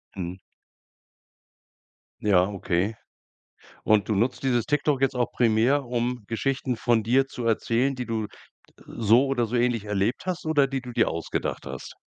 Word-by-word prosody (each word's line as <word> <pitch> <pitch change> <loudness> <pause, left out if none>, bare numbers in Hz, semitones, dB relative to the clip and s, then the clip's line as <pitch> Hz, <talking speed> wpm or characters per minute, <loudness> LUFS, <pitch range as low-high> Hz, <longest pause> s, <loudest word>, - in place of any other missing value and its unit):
Mhm. 90 0 -5 1.8
Ja, 95 -3 +4
okay. 100 +1 -1 0.9
Und 105 -2 +3
du 110 - +1
nutzt 120 +7 0
dieses 120 -3 +2
TikTok 150 -2 +1
jetzt 135 -1 +2
auch 120 -1 0
primär, 120 +4 +2
um 120 0 -2
Geschichten 130 +1 -1
von 115 -1 +2
dir 130 +5 +3
zu 125 -2 -7
erzählen, 115 +4 +1
die 125 - -4
du 110 -2 -2 0.6
so 115 +4 +3
oder 120 -4 0
so 120 +3 -2
ähnlich 120 -3 +1
erlebt 105 - -1
hast 175 -3 -3
oder 145 -3 +3
die 135 -1 -2
du 125 -1 -9
dir 115 - +2
ausgedacht 85 0 -3
hast? - - -7
120 Hz, 155 wpm, -25 LUFS, 110-130 Hz, 1.8 s, Ja